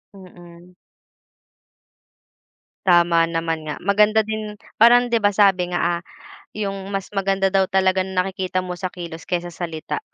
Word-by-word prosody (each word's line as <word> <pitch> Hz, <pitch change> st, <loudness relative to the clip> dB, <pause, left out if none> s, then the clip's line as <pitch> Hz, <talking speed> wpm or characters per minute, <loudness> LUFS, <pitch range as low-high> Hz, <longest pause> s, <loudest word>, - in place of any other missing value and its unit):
Mm. 175 Hz, -1 st, -15 dB, 2.1 s
Tama 170 Hz, -2 st, +4 dB
naman 165 Hz, -1 st, -2 dB
nga. 150 Hz, -1 st, -6 dB
Maganda 210 Hz, +3 st, +3 dB
din 215 Hz, -1 st, -5 dB, 0.2 s
parang 245 Hz, +2 st, +6 dB
'di 235 Hz, -1 st, +1 dB
ba 205 Hz, -, +4 dB
sabi 190 Hz, -3 st, +2 dB
nga, 175 Hz, -, -1 dB
ah, 170 Hz, 0 st, 0 dB, 0.5 s
yung 195 Hz, -2 st, -4 dB
mas 195 Hz, -, -5 dB
maganda 195 Hz, -1 st, 0 dB
daw 190 Hz, -1 st, +2 dB
talagang 190 Hz, 0 st, +1 dB
nakikita 185 Hz, 0 st, -1 dB
mo 180 Hz, -, -6 dB
sa 185 Hz, -, -2 dB
kilos 170 Hz, -3 st, -9 dB
kaysa 175 Hz, -1 st, -3 dB
salita. 165 Hz, -, -5 dB
185 Hz, 135 wpm, -21 LUFS, 175-195 Hz, 2.1 s, parang